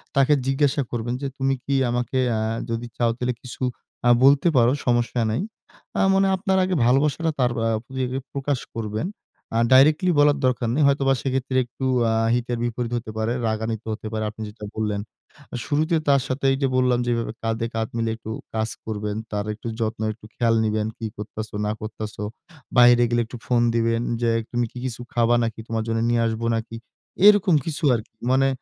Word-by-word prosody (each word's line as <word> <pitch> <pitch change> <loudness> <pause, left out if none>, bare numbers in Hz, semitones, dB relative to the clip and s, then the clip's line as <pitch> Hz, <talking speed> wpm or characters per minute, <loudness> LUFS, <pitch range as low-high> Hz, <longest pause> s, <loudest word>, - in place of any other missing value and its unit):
তাকে 135 +2 +4
জিজ্ঞাসা 140 +1 +2
করবেন 120 0 -2
যে, 140 - -1
"তুমি 135 0 +1
কি 140 - 0
আমাকে 120 +2 -1 0.2
আ - - 0 0.3
যদি 115 +1 -3
চাও 120 -1 +2
তাহলে 125 0 -1
কিছু 125 - -10 0.5
আ - - +6
বলতে 140 +4 +6
পারো, 120 0 +5
সমস্যা 120 0 +1
নাই।" 110 - -1 0.6
আ - - +3
মানে 195 0 +3
আপনার 190 0 0
আগে 185 0 0
ভালোবাসাটা 145 +6 +2
তার 125 -2 +3 0.2
আ - - +2 0.2
প্রতি 130 +1 -5
ইয়ে 130 - -2
প্রকাশ 140 -1 -1 0.2
করবেন। 110 +6 -3 0.5
আ - - +2
ডাইরেক্টলি 150 +7 +6
বলার 145 0 +5
দরকার 125 -2 +1
নেই। 150 - +3
হয়তোবা 140 -1 +3
সেক্ষেত্রে 130 -1 -1
একটু 125 +2 -6 0.3
আ - - +1 0.2
হিতে 120 0 -2
বিপরীত 120 0 -2
হতে 115 -2 -6
পারে, 110 +2 0
রাগান্বিত 110 0 -2
হতে 110 0 -7
পারে, 110 0 -1
আপনি 110 +1 -11
যেটা 105 0 -9
বললেন। 105 -2 -1 0.6
শুরুতে 155 +7 +1
তার 140 -1 +5
সাথে 130 +1 -3
এইযে 135 0 0
বললাম 125 -1 +3
যেভাবে 115 -1 0
কাঁধে 115 +1 -1
কাঁধ 110 -1 -1
মিলে 115 0 0
একটু 110 -1 -8 0.2
কাজ 110 0 -1 0.2
করবেন, 105 -1 -3 0.2
তার 105 -1 -2
একটু 110 - -9
যত্ন, 110 -1 -2
একটু 110 0 -17
খেয়াল 115 -1 +2
নিবেন। 110 0 0
"কি 115 - -5
করতেছো 105 +1 -6
না - - 0
করতেছো?" 110 -1 -6 0.5
বাইরে 120 0 +7
গেলে 120 0 +2
একটু 120 +2 -9
ফোন 120 -1 +2
দিবেন, 115 0 +1 0.2
"যে 120 - +2 0.2
তুমি 120 0 0
কি - - -12
কিছু 125 -2 -4
খাবা 120 0 +3
নাকি? 115 -1 -3
তোমার 115 -1 -1
জন্য 115 0 0
নিয়ে 120 0 +2
আসবো 115 +1 -2
নাকি?" 115 0 -6 0.5
এরকম 205 -5 +6
কিছু 160 0 -4
আরকি। 110 -1 -7 0.2
মানে 135 +1 +4
120 Hz, 185 wpm, -23 LUFS, 115-135 Hz, 0.6 s, বাইরে